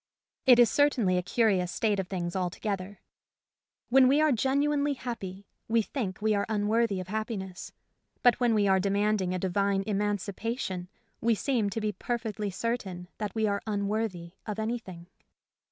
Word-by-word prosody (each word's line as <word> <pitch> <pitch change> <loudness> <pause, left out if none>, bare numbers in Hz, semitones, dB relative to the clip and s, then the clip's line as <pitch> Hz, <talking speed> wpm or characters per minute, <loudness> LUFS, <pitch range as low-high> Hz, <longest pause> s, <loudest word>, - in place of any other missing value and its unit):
It 250 -2 +9
is 240 -1 +6
certainly 255 -10 +3
a - - -1
curious 185 -3 +1
state 210 -1 0
of 190 - -2
things 175 -2 -3
alto 180 -2 -2
gether. 200 -2 -4 0.9
When 260 +1 +6
we 280 +3 +4
are 310 -1 +4
genuinely 280 +3 +1
happy, 200 -7 -6 0.2
we 225 0 +3
think 205 -7 -4
we 215 0 +3
are 200 -1 0
unworthy 215 -1 +1
of 185 0 -7
happiness. 205 -4 -4 0.5
But 245 -2 +5
when 240 -3 +3
we 205 -1 +3
are 190 0 +4
demanding 200 -1 +1
a - - 0
divine 195 +2 +1
emancipation 205 -1 -2 0.3
we 230 0 +3
seem 230 -3 0
to 210 - -3
be 210 0 0
perfectly 220 -2 -3
certain 190 -4 -3
that 210 -1 -4
we 220 -1 +1
are 200 -1 0
unworthy 200 -4 -2 0.2
of 210 -1 -3
anything. 220 -6 -4
210 Hz, 160 wpm, -29 LUFS, 190-230 Hz, 0.9 s, It